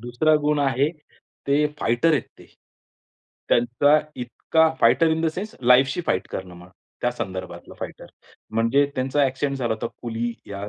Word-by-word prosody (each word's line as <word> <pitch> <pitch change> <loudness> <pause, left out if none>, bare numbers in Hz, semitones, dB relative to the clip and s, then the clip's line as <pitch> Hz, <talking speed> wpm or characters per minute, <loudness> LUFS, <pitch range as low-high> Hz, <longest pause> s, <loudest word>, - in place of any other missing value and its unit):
दुसरा 120 +7 +1
गुण 150 0 +1
आहे 140 +1 +1 0.6
ते 145 +2 +3
फायटर 120 +8 +2
आहेत 140 - +2 0.2
ते. - - -15 1.0
त्यांचा 125 +6 +3 0.2
इतका 160 +6 +1
fighter 165 -1 +5
in 160 0 0
the - - +2
sense 210 +3 -5
life 125 +2 +6
she 175 - -2
fight 95 - 0
करणं 90 -2 -6
म्हणा, 90 +1 -15 0.3
त्या 125 - +1
संदर्भातला 95 -6 -7
फाइटर. - - -7 0.4
म्हणजे 115 +6 +2
त्यांचा 135 +3 +1
ॲक्सिडेंट 135 +1 -1
झाला 120 -3 0
होता 110 - -4 0.2
कुली 120 0 -3
या 100 0 -6
125 Hz, 155 wpm, -23 LUFS, 115-145 Hz, 1.0 s, life